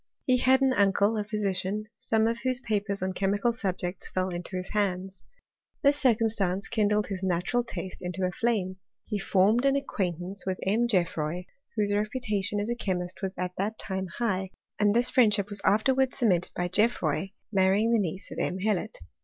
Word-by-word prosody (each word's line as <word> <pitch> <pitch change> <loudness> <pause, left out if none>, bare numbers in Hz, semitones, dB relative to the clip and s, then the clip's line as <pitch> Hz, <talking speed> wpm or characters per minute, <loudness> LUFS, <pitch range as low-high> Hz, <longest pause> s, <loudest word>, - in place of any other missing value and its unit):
He 255 -1 +4
had 260 +2 +4
an 265 -1 +4
uncle 200 0 +3
a 210 - 0
physfaj 205 -1 -2 0.2
some 220 0 +2
of 230 +1 0
whose 255 0 0
papers 200 -5 -2
on 190 0 -1
chemical 200 +5 +1
subjects 185 -4 -3
fell 185 0 -1
i 175 - -3
his 185 0 -4
hands. 190 -2 -2 0.6
This 285 0 +5
circumstance 220 -8 +2
kindled 210 -2 +2
his 195 -2 -5
naturalt 190 +7 0 0.3
into 180 +1 -3
a 180 - 0
flame: 190 -3 -1 0.3
he 210 -3 -2
formed 205 +4 +3
an 275 0 +3
acquaintance 190 - -3
with* 190 -1 -2
GeofFroy, 180 -6 0 0.3
whose 205 -2 +1
reputation 210 -2 -1
as 210 +3 -2
a - - 0
chemist 185 -5 -3
was 190 -1 -3
at 180 0 -2
j 200 +2 +1
time 190 -1 -3
high, 195 -5 0 0.3
and 205 0 +3
this 240 +1 +2
friendship 210 -6 +3
was 200 -1 -5
afterwards 260 +6 +2
cemest 185 -8 +2
by 180 - 0
GeofFroy 195 -2 +1 0.2
marrying 195 +3 +3
the 230 - +4
niece 190 -1 -3
of - - -5
M. 180 - -1
Hellot. 210 +1 -1
205 Hz, 170 wpm, -28 LUFS, 185-225 Hz, 0.6 s, This